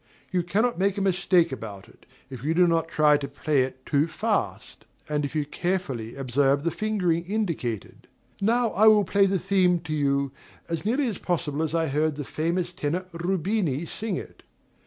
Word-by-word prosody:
You 180 -1 +1
cannot 205 +5 0
make 195 +1 +1
a - - 0
mistake 185 -3 +3
about 110 -6 -7
it, - - -22 0.2
if 130 -2 -8
you 160 +3 0
do 180 +1 +6
not 165 -2 +1
try 150 -2 +4
to 140 -1 -4
play 145 0 0
it 130 0 -4
too 145 +1 +2
fast, 160 - -2 0.2
and 150 -1 -1
if 145 +2 -4
you 150 -2 0
carefully 150 -8 -3
observe 135 +1 +1
the 170 - 0
fingering 180 -6 0
indicated. 170 - -3 0.3
Now 230 +2 +2
I 215 +3 +4
will 215 -1 +7
play 200 +2 +3
the 195 0 +1
theme 185 -1 +2
to 155 -2 -5
you, 140 -2 +1 0.4
as 165 +1 -3
nearly 260 +5 +1
as 220 - -3
possible 155 -4 -1
as 160 0 -1
I 165 -1 +2
heard 150 +2 0
the 145 -1 -5
famous 175 +4 -2
tenor 175 +2 -2
Rubini 175 -3 -1
sing 215 +3 -3
it. - - -8
165 Hz, 185 wpm, -26 LUFS, 145-190 Hz, 0.4 s, will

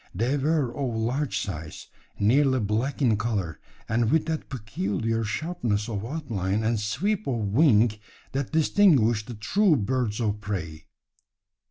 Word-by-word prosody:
They 120 +8 +1
were 145 -3 0
of 130 -5 -2
large 125 +6 -1
size, 80 -5 -5 0.3
nearly 130 +5 +3
black 115 +7 -1
in 115 -5 +3
colour, 100 -7 -2 0.3
and 115 0 +1
with 160 +3 +2
that 160 -1 -3
peculiar 115 -2 -2
sharpness 110 -4 -2
of 105 -4 -3
outline 110 - -2
and 110 0 +1
sweep 185 - -1
of 130 - 0
wing 115 +1 +4 0.4
that 135 0 -3
distinguish 145 - +4
the 120 +2 -8
true 185 - +2
birds 125 -2 -1
of 105 -2 -1
prey. 80 -7 -5
115 Hz, 140 wpm, -26 LUFS, 105-140 Hz, 0.4 s, wing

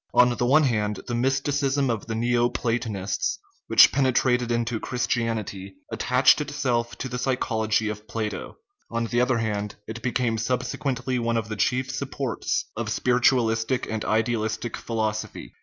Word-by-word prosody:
On 125 0 +5
the 120 - 0
one 155 +5 +5
hand, 105 -6 0
the 120 - -4
mysticism 135 +2 +1
of 110 -2 -4
the 110 - -3
Neo 120 +1 +2
Platonists, 110 -6 -2 0.3
which - - +7
penetrated 125 -2 +2
into 120 -1 0
Christianity, 115 -6 -2 0.2
attaches - - +4
itself 125 -5 -1
to 130 - -4
the 125 0 -4
psychology 110 -4 0
of 105 0 -5
Plato; 110 -2 -4 0.3
on 115 0 -1
the 120 +1 +1
other 125 -1 +2
hand, 105 -2 -2
it 115 +1 -6
became 120 -2 0
subsequently 125 +1 -1
one 115 0 0
of 110 -1 -3
the 110 - -3
chief 130 +5 0
supports 135 -3 -2
of - - -3
spiritualistic 125 -1 +2
and 110 -1 -2
idealistic 110 0 -1
philosophy. 110 - -3
120 Hz, 145 wpm, -25 LUFS, 110-125 Hz, 0.3 s, which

